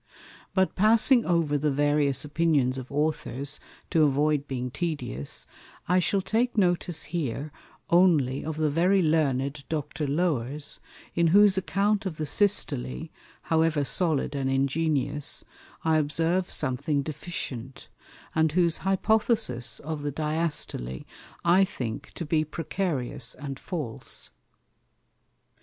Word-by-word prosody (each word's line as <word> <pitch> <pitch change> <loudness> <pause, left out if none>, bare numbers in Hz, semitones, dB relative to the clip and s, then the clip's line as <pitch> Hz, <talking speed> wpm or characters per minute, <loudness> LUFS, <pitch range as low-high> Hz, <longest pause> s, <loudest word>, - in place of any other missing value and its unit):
But 190 -1 +2
passing 230 +5 +5
over 165 -5 +2
the 150 +1 +1
various 145 -1 +2
Opinions 145 -4 +1
of 130 +1 -10
Authors, 145 -1 -1 0.3
to 165 - +3
avoid 145 0 +2
being 125 -2 -3
tedious, 145 - -2 0.4
I 180 +1 +4
shall 190 +2 +1
take 235 +3 0
notice 175 -3 +1
here 150 -2 -2 0.4
only 160 -7 +4
of 155 -1 -4
the 155 -2 +1
very 180 +5 +3
Learned 140 -3 +1
Dr. 150 -1 -3
Lower's, 145 -2 -1 0.3
in 170 0 +3
whose 200 +3 +6
Account 200 +2 +1
of 160 -4 -6
the 155 - -2
Systole, 65 - +1 0.3
however 160 -3 +2
solid 155 -3 +1
and 135 -2 -1
ingenious, 140 +1 0 0.4
I 160 -1 +3
observe 165 +5 0
something 140 +1 -1
deficient, 135 -5 -6 0.5
and 160 -1 +2
whose 170 -2 +3
Hypothesis 195 - +1
of 155 0 -4
the 145 0 -2
Diastole 150 - -2 0.4
I 180 +3 +6
think 125 - -4
to 170 - -4
be 155 0 +1
precarious 155 -6 -3
and 135 0 -7
false. 150 - -5
155 Hz, 120 wpm, -27 LUFS, 140-175 Hz, 0.5 s, whose